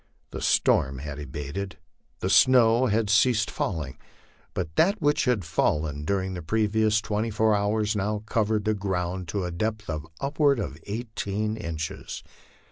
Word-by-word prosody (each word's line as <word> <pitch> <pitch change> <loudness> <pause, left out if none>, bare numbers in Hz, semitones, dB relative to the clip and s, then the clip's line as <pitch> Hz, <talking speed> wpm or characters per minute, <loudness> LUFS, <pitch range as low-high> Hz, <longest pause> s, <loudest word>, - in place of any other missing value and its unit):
The - - -6
storm 65 0 +2
had 75 +2 -6
abated, 75 +7 -5 0.4
the 95 - 0
snow 125 0 +5
had 110 0 +1
ceased 110 +2 +3
falling, 75 -8 -3 0.6
but 85 -4 -3
that 200 +6 +3
which 145 -1 +2
had 120 -8 +1
fallen 75 -2 0
during 95 +1 -1
the 90 - -5
previous 110 +3 +2
twenty 110 +1 -1
four 110 0 +2
hours 105 +1 +1
now 105 +1 -1
covered 110 -1 0
the 110 - +2
ground 95 -2 -2
to 95 +2 -2
a 90 - -3
depth 110 +3 -2
of 75 0 -5
upward 140 0 +2
of 75 - -4
eighteen 110 -1 -3
inches. 80 -7 -5
105 Hz, 150 wpm, -26 LUFS, 85-110 Hz, 0.6 s, snow